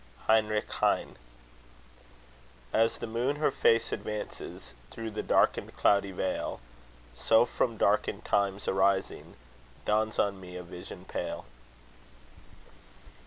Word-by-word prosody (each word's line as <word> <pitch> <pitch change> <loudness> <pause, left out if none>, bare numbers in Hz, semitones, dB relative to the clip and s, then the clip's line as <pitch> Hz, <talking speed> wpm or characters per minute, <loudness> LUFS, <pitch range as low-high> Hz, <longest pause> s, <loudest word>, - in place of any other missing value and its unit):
HEINRICH 110 -1 +3
HEINE - - +1 1.6
As 115 +1 +3
the - - -5
moon 120 +5 -1
her 150 -1 +1
face 115 -3 +3
advances 105 - -6 0.2
Through 115 - -6
the 105 - -3
darkened - - +2
cloudy 100 -1 +3
veil; 95 0 -2 0.5
So, 110 - +4
from 115 -1 -1
darkened - - +1
times 100 0 0
arising, 95 0 +1 0.5
Dawns 110 +1 +1
on 100 -1 0
me 90 -1 -10
a 90 - -6
vision 90 0 -10
pale. - - -4
105 Hz, 110 wpm, -30 LUFS, 95-115 Hz, 1.6 s, So